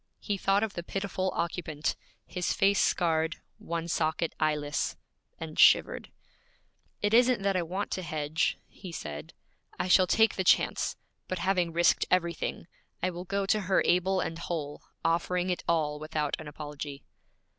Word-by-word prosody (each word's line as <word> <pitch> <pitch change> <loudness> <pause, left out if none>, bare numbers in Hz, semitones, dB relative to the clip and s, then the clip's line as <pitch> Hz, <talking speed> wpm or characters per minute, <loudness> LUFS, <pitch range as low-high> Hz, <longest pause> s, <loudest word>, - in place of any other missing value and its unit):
He 205 - -2
thought 195 +2 +2
of 220 -2 -2
the 175 - -4
pitiful 190 +1 -2
occupant 160 -3 -2 0.3
his 180 -1 -2
face 195 0 +3
scarred, 160 -2 +1 0.2
one 170 0 -4
socket 160 0 0
eyeless 150 -1 0 0.4
and - - -6
shivered. - - +5 0.9
'It 205 +1 +2
isn't 245 -2 +4
that 195 -1 +1
I 180 - +2
want 185 +4 -3
to 185 - -2
hedge,' 155 -2 -1
he 185 -3 -10
said. 75 - -7 0.4
'I - - 0
shall 185 0 +6
take 220 +3 +3
the 190 - +1
chance; - - +2 0.3
but 185 - -3
having 180 -1 +1
risked 170 +1 +3
everything, 170 -2 0 0.4
I 185 - +1
will 175 +1 -7
go 200 +1 -1
to 215 +2 +2
her 190 0 +2
able 185 +2 +2
and 165 -1 -4
whole, 155 -4 -4 0.2
offering 175 +2 +1
it 180 - -3
all 150 -3 +1
without 155 -1 -2
an 155 - -8
apology.' 145 -1 -7
175 Hz, 155 wpm, -29 LUFS, 155-190 Hz, 0.9 s, shall